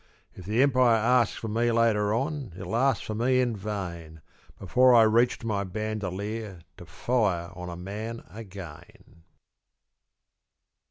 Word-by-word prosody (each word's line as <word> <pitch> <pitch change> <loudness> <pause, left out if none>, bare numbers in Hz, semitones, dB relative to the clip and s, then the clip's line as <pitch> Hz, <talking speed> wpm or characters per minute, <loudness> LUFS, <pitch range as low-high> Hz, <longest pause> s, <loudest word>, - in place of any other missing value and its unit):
If 90 - -12
the 110 +6 +2
Empire 130 -4 +4
asks 115 +1 +2
for 115 - -5
me 115 +2 +1
later 110 -3 +2
on 135 - -2
It'll 95 +3 -4
ask 130 0 +2
for 110 - -5
me 125 +4 +2
in 120 -3 +1
vain, 85 -6 -6 0.4
Before 125 +6 +4
I 115 - +8
reach 115 +3 +3
to - - -11
my 105 -3 -1
bandolier 105 -1 -4 0.2
To - - -12
fire 100 -9 -1
on 90 -1 -7
a 85 - -6
man 110 +6 -6
again. 95 -6 -12
110 Hz, 145 wpm, -27 LUFS, 95-120 Hz, 0.4 s, I